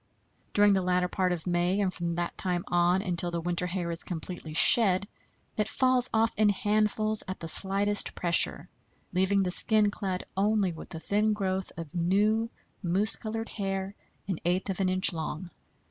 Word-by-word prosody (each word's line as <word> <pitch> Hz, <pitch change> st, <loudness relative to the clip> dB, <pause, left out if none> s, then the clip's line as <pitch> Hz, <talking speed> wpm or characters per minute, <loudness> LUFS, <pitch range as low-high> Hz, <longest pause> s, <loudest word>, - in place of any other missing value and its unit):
During 205 Hz, 0 st, +5 dB
the 190 Hz, -, +2 dB
latter 180 Hz, 0 st, +1 dB
part 185 Hz, 0 st, -1 dB
of 170 Hz, -3 st, -3 dB
May, 175 Hz, +2 st, 0 dB
and 190 Hz, -2 st, 0 dB
from 170 Hz, -1 st, -3 dB
that 175 Hz, 0 st, -3 dB
time 180 Hz, -2 st, -2 dB
on 175 Hz, +2 st, +2 dB
until 175 Hz, -3 st, -2 dB
the 170 Hz, -, -3 dB
long 165 Hz, -, -5 dB
winter 175 Hz, +1 st, 0 dB
hair 175 Hz, -1 st, -3 dB
is 165 Hz, -, -3 dB
completely 165 Hz, -2 st, -7 dB
shed, 200 Hz, +1 st, +5 dB, 0.5 s
it 210 Hz, -1 st, 0 dB
falls 255 Hz, +1 st, +1 dB
off 225 Hz, 0 st, +1 dB
in 215 Hz, 0 st, +4 dB
handfuls 215 Hz, +1 st, +1 dB
at 185 Hz, -, -6 dB
the 165 Hz, -, -6 dB
slightest 200 Hz, +4 st, +2 dB
pressure, 170 Hz, -1 st, +2 dB, 0.5 s
leaving 190 Hz, +2 st, +2 dB
the 180 Hz, -, -2 dB
skin 210 Hz, +1 st, +3 dB
clad 190 Hz, -3 st, -4 dB
only 200 Hz, -1 st, +1 dB
with 165 Hz, +1 st, -10 dB
a -, -, -5 dB
thin 210 Hz, +5 st, 0 dB
growth 190 Hz, -2 st, -3 dB
of 165 Hz, -3 st, -8 dB
new, 205 Hz, +6 st, +1 dB, 0.3 s
mouse 195 Hz, +3 st, 0 dB
colored 225 Hz, +1 st, -5 dB
hair 195 Hz, -1 st, -4 dB, 0.3 s
an 190 Hz, -5 st, -3 dB
eighth 180 Hz, +3 st, 0 dB
of 190 Hz, -, -6 dB
an 190 Hz, -1 st, +1 dB
inch 185 Hz, 0 st, +3 dB
long. 160 Hz, +2 st, -5 dB
190 Hz, 180 wpm, -28 LUFS, 175-205 Hz, 0.5 s, During